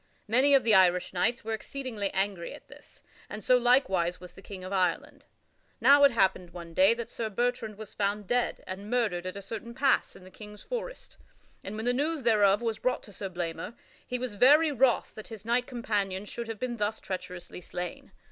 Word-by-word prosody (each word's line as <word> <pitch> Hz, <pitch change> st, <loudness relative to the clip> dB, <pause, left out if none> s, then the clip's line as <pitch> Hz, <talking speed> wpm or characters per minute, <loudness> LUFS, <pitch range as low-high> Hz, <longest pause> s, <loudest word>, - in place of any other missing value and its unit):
Many 260 Hz, +6 st, +4 dB
of 270 Hz, -, +4 dB
the 225 Hz, -, +3 dB
Irish 180 Hz, -2 st, +4 dB
knights 235 Hz, +7 st, 0 dB
were 225 Hz, -, -2 dB
exceedingly 225 Hz, -3 st, -4 dB
angry 195 Hz, -3 st, -2 dB
at -, -, -16 dB
this, -, -, -15 dB, 0.3 s
and 210 Hz, 0 st, -7 dB
so 255 Hz, -, +5 dB
likewise 235 Hz, -9 st, +2 dB
was 180 Hz, -1 st, -12 dB
the -, -, -14 dB
King 195 Hz, -2 st, -9 dB
of 185 Hz, +2 st, -6 dB
Ireland. 185 Hz, -2 st, -1 dB, 0.5 s
Now 285 Hz, +1 st, +6 dB
it -, -, +7 dB
happened 190 Hz, -6 st, +1 dB
one 170 Hz, -1 st, -10 dB
day 190 Hz, +6 st, +5 dB
that 235 Hz, -1 st, -6 dB
Sir 225 Hz, -2 st, -3 dB
Bertrand 225 Hz, -1 st, -2 dB
was 215 Hz, -2 st, -9 dB
found 205 Hz, 0 st, -1 dB
dead 245 Hz, +4 st, -1 dB
and 195 Hz, +3 st, -7 dB
murdered 215 Hz, -8 st, 0 dB
at 185 Hz, -, -5 dB
a 200 Hz, -, -7 dB
certain 225 Hz, +3 st, -7 dB
pass 270 Hz, 0 st, +2 dB
in -, -, -14 dB
the 185 Hz, -, -14 dB
King's 210 Hz, +1 st, -12 dB
forest, -, -, -6 dB, 0.5 s
and 200 Hz, -, -6 dB
when 220 Hz, +1 st, -4 dB
the 245 Hz, -, +2 dB
news 295 Hz, +2 st, -1 dB
thereof 210 Hz, -2 st, +4 dB
was 225 Hz, -2 st, -2 dB
brought 255 Hz, -, -1 dB
to 205 Hz, -, -12 dB
Sir 195 Hz, +1 st, -5 dB
Blamor, 175 Hz, +4 st, -5 dB, 0.3 s
he 250 Hz, -, -2 dB
was 250 Hz, -3 st, -4 dB
very 295 Hz, +9 st, +5 dB
wroth 265 Hz, -3 st, +2 dB
that 215 Hz, -, -10 dB
his 220 Hz, -2 st, -10 dB
knight 245 Hz, +2 st, +1 dB
companion 205 Hz, -6 st, -2 dB
should 235 Hz, +2 st, -6 dB
have 225 Hz, -1 st, -5 dB
been 240 Hz, +1 st, -3 dB
thus 210 Hz, +1 st, -1 dB
treacherously 180 Hz, -1 st, -7 dB
slain. 180 Hz, 0 st, -7 dB
215 Hz, 205 wpm, -29 LUFS, 190-245 Hz, 0.5 s, it